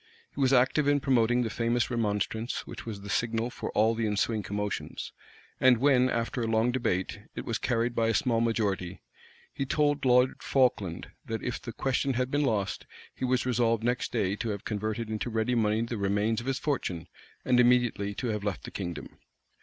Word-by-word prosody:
He 140 - -4
was 130 -1 +4
active 135 +3 +3
in 145 0 +4
promoting 125 -3 +2
the 115 - -3
famous 120 +1 0
remonstrance, 110 0 -1
which - - -9
was 105 -3 -5
the 100 - -9
signal 115 +1 0
for - - -5
all 110 +2 +3
the 115 -1 -1
ensuing 105 +1 0
commotions; 105 +1 -4 0.5
and 130 -2 +6
when, 130 0 +4
after 115 +1 -1
a 115 - -1
long 115 +2 +2
debate, 115 -7 -1 0.2
it - - -5
was - - -2
carried 120 0 0
by 115 -1 +1
a 115 - +1
small 120 -6 +2
majority, 100 -6 -1 0.5
he - - -2
told 145 +1 +1
Lord 125 0 +3
Falkland, 110 -10 0
that 110 0 -4
if 125 - -3
the 115 - -6
question 135 +2 0
had 125 +1 -1
been 145 - +2
lost, 105 -7 -1 0.3
he - - -3
was 125 0 +1
resolved 115 -2 +1
next 120 +1 0
day 100 -5 0
to 115 - -3
have 100 -2 -4
converted 110 +2 -2
into 110 +2 -3
ready 115 +2 0
money 110 -2 +2
the 115 0 -4
remains 105 +3 +1
of 120 - -9
his 135 -1 0
fortune, 95 - -2 0.4
and 125 -1 +4
immediately 120 -5 +3
to 120 - -3
have 105 -2 -2
left 95 -12 -3
the - - -8
kingdom. 85 -5 -6
115 Hz, 195 wpm, -28 LUFS, 105-125 Hz, 0.5 s, and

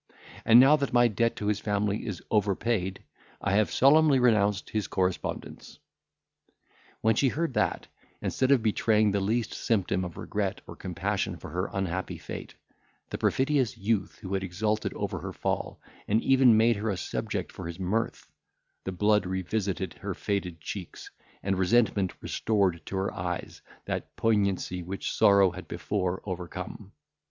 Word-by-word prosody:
And, 115 +1 +8
now 140 +4 +7
that 140 -4 -2
my 120 -1 +6
debt 115 +1 0
to 105 - -5
his 105 0 +1
family 105 0 -1
is 100 -4 -5
over 105 -2 +2
paid, 95 -4 -2 0.4
I - - -1
have 105 +1 +3
solemnly 145 +1 +5
renounced 105 -5 +2
his 110 -2 -1
correspondence." 90 -1 -3 1.2
When 110 +1 +4
she 135 - +3
heard 155 +3 -1
that, - - 0 0.3
instead 130 - 0
of 135 -5 +4
betraying 110 -1 +3
the 100 - +1
least 110 +3 0
symptom 95 -4 0
of 90 -3 -6
regret - - -2
or - - -10
compassion - - -2
for - - -10
her 90 +4 -2
unhappy 95 -1 -3
fate, - - -8 0.6
the - - -4
perfidious 130 -4 +1
youth 105 0 -1
had 95 0 -1
exulted 105 +4 -1
over - - -3
her - - -6
fall, - - -3 0.3
and 105 +2 +3
even 130 -4 +6
made 115 0 +4
her 110 +2 -2
a 100 - -1
subject - - -3
for - - -7
his 85 0 -6
mirth, 105 +5 -2 0.6
the 95 - -2
blood 105 +1 +2
revisited 95 -1 -2
her - - -3
faded 95 -5 -3
cheeks, 90 +3 -7 0.3
and 95 -1 0
resentment 100 -1 +2
restored 95 -7 0
to - - -4
her 95 +1 -1
eyes 90 0 -4 0.2
that - - -4
poignancy 100 -4 +1
which 95 +3 -4
sorrow 100 -2 +5
had 95 +1 -9
before 90 +1 -2
overcome. 90 +1 -6
100 Hz, 155 wpm, -28 LUFS, 95-115 Hz, 1.2 s, And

